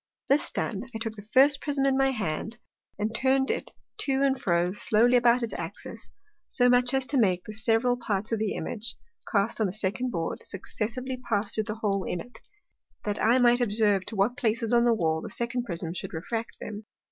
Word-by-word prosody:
This 280 +2 +4
done, 215 +1 -3
I - - 0
took 225 -1 -4
the 210 - -10
first 270 +7 +4
Prism 280 -2 0
in 270 -1 +3
my 270 0 +3
Hand, 215 -1 -3 0.4
and 210 +2 -2
turn'd 265 +2 +2
it - - -4 0.3
to 270 -1 +1
and 270 -1 +1
fro 175 0 +2
slowly 225 +4 +3
about 240 0 +4
its 230 - -3
Axis, - - -7 0.4
so 245 0 +3
much 245 0 +4
as 265 -1 +2
to 275 0 +1
make 185 -5 +2
the 215 - -8
several 225 +3 +2
parts 215 -3 -2
of 225 - 0
the 215 -2 0
Image, 230 +1 -3 0.4
cast 215 +2 +1
on 215 - +3
the - - -3
second 205 +5 -1
Board, 165 -7 -3
successively 235 +6 -4
pass 220 -4 -1
through 215 - -1
the 210 - -4
hole 200 -3 -1
in 180 - -3
it, 245 +8 -10 0.7
that 205 0 -1
I 230 +3 +4
might 245 -1 +4
observe 205 -4 +2
to 225 - -6
what 210 +6 +1
places 230 -2 0
on 240 0 +5
the 240 - +5
Wall 160 -5 0
the - - -7
second 240 +1 -3
Prism 170 -4 -4
would - - -8
refract 225 +8 -4
them. 210 0 -7
225 Hz, 205 wpm, -27 LUFS, 205-245 Hz, 0.7 s, on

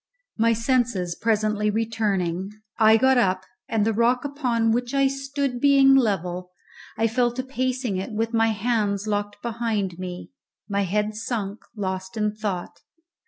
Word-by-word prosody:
My 230 +1 +3
senses 230 -6 0
presently 215 0 +1
returning, 205 -5 -1 0.3
I 220 0 +7
got 260 +2 +4
up, 185 -4 +1 0.3
and 220 -2 +1
the 225 - +1
rock 240 +4 +2
upon 245 -6 0
which 245 +3 -1
I 275 0 +4
stood 275 -2 -3
being 275 -1 +6
level, 185 -8 +1 0.5
I 225 - +2
fell 240 +2 +2
to 255 +1 -3
pacing 255 -5 -2
it 190 +5 -4
with 225 +2 -2
my 225 0 +3
hands 215 -2 0
locked 205 -1 -3
behind 220 -6 -2
me, 180 +3 -7 0.4
my 200 -1 0
head 210 +3 0
sunk, 215 -2 -4 0.2
lost 190 0 -4
in 210 -1 0
thought. 200 -5 -4
220 Hz, 150 wpm, -24 LUFS, 200-245 Hz, 0.5 s, I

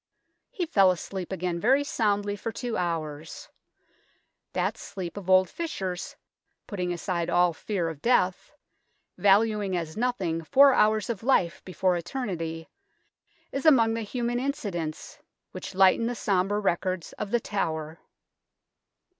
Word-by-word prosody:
He 420 -8 -3
fell 195 - +4
asleep 185 +1 -3
again 180 -2 -2
very 265 +8 +3
soundly 205 -6 0
for 225 +3 -4
two 235 +1 -4
hours. 160 -3 -4 1.0
That - - 0
sleep 190 -4 -7
of 195 -2 -7
old 185 0 +6
Fisher's, 190 - -4 0.5
putting 180 -5 -3
aside 170 0 -2
all 175 -1 +3
fear 180 +1 -2
of 160 -3 -6
death, 190 -7 +1 0.7
valuing 205 -1 +3
as 160 -2 -4
nothing 195 -9 -1
four 275 - +6
hours 215 -1 +3
of 215 - -6
life 190 -8 +1
before 185 0 +1
eternity, 170 -5 -4 0.8
is 275 - -3
among 235 -8 +5
the 230 - -2
human 240 +2 -2
incidents 195 - -4 0.3
which - - -8
lighten 195 +4 +5
the 245 - -2
sombre 200 -1 +1
records 185 -3 -1
of 205 - -3
The 240 - +2
Tower. 160 -7 -3
195 Hz, 130 wpm, -27 LUFS, 175-225 Hz, 1.0 s, old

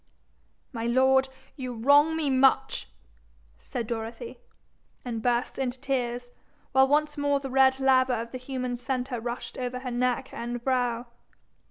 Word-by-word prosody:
'My 230 -1 -3
lord, 265 +2 +4 0.3
you 255 -3 -5
wrong 285 +7 +5
me 300 -4 0
much,' 260 - +2 0.7
said 240 -2 -5
Dorothy, 230 - -6 0.7
and 230 -2 -3
burst 240 +2 0
into 255 -1 -2
tears, 245 -3 -2 0.4
while 265 0 +5
once 295 +1 +1
more 285 -1 +2
the 270 -1 -6
red 265 0 +4
lava 260 -1 +4
of 230 0 -6
the 255 - -6
human 255 -1 -4
centre 250 0 -3
rushed 240 +3 -5
over 250 0 -3
her 255 -1 -4
neck 250 +1 -1
and 240 0 -5
brow. 245 -2 0
255 Hz, 145 wpm, -27 LUFS, 240-265 Hz, 0.7 s, wrong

